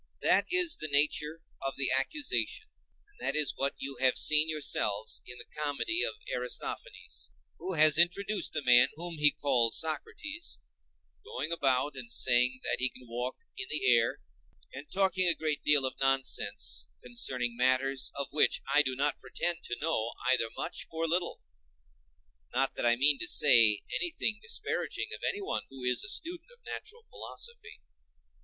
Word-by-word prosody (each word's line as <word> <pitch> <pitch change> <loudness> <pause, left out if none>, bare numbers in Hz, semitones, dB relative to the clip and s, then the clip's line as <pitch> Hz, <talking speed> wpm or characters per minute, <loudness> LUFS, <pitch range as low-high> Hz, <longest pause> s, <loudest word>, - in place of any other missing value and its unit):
That - - +2
is 360 -3 +3
the 155 - -2
nature 150 +2 +1 0.2
of 135 0 -4
the 135 -1 0
accusation, 290 - 0 0.4
and 415 0 -26
that - - -3
is 155 -2 0
what 140 +1 -2
you 135 -1 -7
have 130 0 +2
seen 155 +1 +4
yourselves 110 -9 -1
in 125 - -7
the - - -9
comedy 150 - -1
of 465 - 0 0.2
Aristophanes; - - -5 0.3
who 190 - -4
has 155 -1 +5
introduced 195 +4 +1
a 155 - -2
man 125 -1 +6
whom 170 0 -4
he 150 0 +5
calls 125 -6 +2
Socrates, 310 - -3 0.7
going 150 +5 -5
about 140 -3 +2
and 120 -3 -8
saying 125 +1 +4
that - - -2
he 130 +1 +2
can 125 -1 -16
walk 120 +2 -4
in 130 - -5
the 155 - -2
air, 115 -1 0 0.5
and 145 +3 -10
talking 190 -1 +2
a 160 -3 +1
deal 145 -2 +4
of 130 - -1
nonsense 135 - +1 0.2
concerning 120 0 0
matters 130 +2 +2
of 140 0 -5
which 150 - +3
I 150 - +7
do 130 -3 -3
not 145 +3 +2
pretend 175 -1 -4
to 120 - -4
know 115 -8 0 0.2
either 115 -3 0
much - - -3
or 165 0 -3
little—not - - -5
that - - -1
I 120 - +4
mean 140 +3 +3
to - - -1
say 115 -7 +5
anything 320 - -2
disparaging 460 - -4
of - - -9
anyone 400 0 -1
who 135 -1 -11
is 125 0 0
a 210 - -6
student 345 - -4
of 485 0 -22
natural 470 +1 -9
philosophy. 475 -1 -9
140 Hz, 160 wpm, -29 LUFS, 125-170 Hz, 0.7 s, I